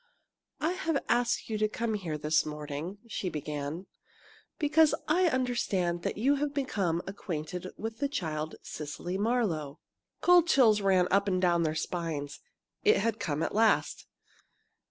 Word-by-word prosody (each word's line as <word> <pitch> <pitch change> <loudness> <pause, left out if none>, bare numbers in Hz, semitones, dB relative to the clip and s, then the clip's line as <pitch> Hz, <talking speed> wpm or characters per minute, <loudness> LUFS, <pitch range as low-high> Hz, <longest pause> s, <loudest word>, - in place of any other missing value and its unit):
"I 320 - +1
have 325 -5 -1
asked 240 0 +1
you 215 -2 -2
to 215 - +3
come 230 +1 -2
here 175 -7 -3
this 150 +1 +2
morning," 150 +4 -5
she 195 -4 -3
began, 150 +2 -4 0.7
"because 310 +1 +4
I 355 +4 +3
understand 205 - 0
that - - -3
you 275 +6 +3
have 290 0 -2
become 195 - -1
acquainted 180 -2 -5
with 225 +1 -5
the 280 - 0
child 160 - -3
Cecily 165 +5 -5
Marlowe." 200 - 0 0.4
Cold 355 -1 +5
chills 230 -9 +5
ran 190 -2 +3
up 200 +1 +3
and 185 -2 +1
down 175 -2 +3
their 155 -1 0
spines. 155 -3 -3 0.4
It 430 0 +5
had 225 -1 0
come 160 -5 -1
at - - -2
last! 225 +1 +2
195 Hz, 150 wpm, -30 LUFS, 160-245 Hz, 0.7 s, Cold